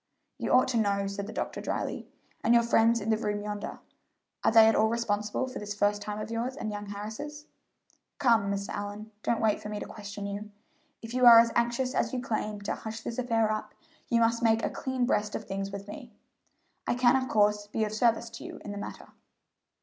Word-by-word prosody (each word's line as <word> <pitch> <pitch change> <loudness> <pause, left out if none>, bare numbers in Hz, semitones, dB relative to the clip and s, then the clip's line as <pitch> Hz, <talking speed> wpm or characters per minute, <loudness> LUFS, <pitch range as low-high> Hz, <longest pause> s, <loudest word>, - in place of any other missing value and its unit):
"You - - -2
ought 255 0 +5
to 245 - 0
know," 200 -2 +1
said 200 0 -4
the - - -6
doctor - - -4
dryly. - - -3 0.4
"And 235 +1 +4
your 235 - +5
friends 230 0 +4
in 220 +2 -1
the 220 - +3
room 210 -1 -2
yonder, 210 0 -5 0.7
are - - +4
they 225 0 +8
at 225 - +5
all 220 - +4
responsible 215 0 -1
for 255 - -6
this 210 0 -5
first 205 0 +1
time 210 0 -4
of 215 - -5
yours 240 +3 -2
and 215 -6 -4
young 205 0 -6
Harris's? 220 +10 -7 0.7
Come, 230 -7 +3
Mr. 200 0 -3
Allyn, 205 +1 -5
don't 235 - 0
wait 220 -2 +2
for 210 - -6
me 210 -1 -4
to - - -5
question 205 -1 -7
you. 200 +1 -5 0.5
If 225 +1 -7
you 255 -1 +5
are 235 -1 +11
as 230 0 +4
anxious 240 +2 0
as 230 - 0
you 255 - -1
claim 215 -4 -3
to 200 - -2
hush 220 0 -6
this 235 - -5
affair 225 -3 +1
up, 215 0 -4 0.3
you 235 - +3
must 230 0 +2
make 225 -1 +3
a - - -2
clean 260 -2 -1
breast 210 -4 0
of 215 - -5
things 195 0 -3
with 200 0 -7
me. 245 +2 -9 0.8
I - - +1
can, 245 0 +4
of 260 -1 0
course, 210 -1 +2
be 220 +1 -1
of 215 0 -2
service 230 +1 +1
to 230 - -9
you - - -8
in 205 - -5
the 205 - -5
matter." - - -8
220 Hz, 225 wpm, -29 LUFS, 205-235 Hz, 0.8 s, are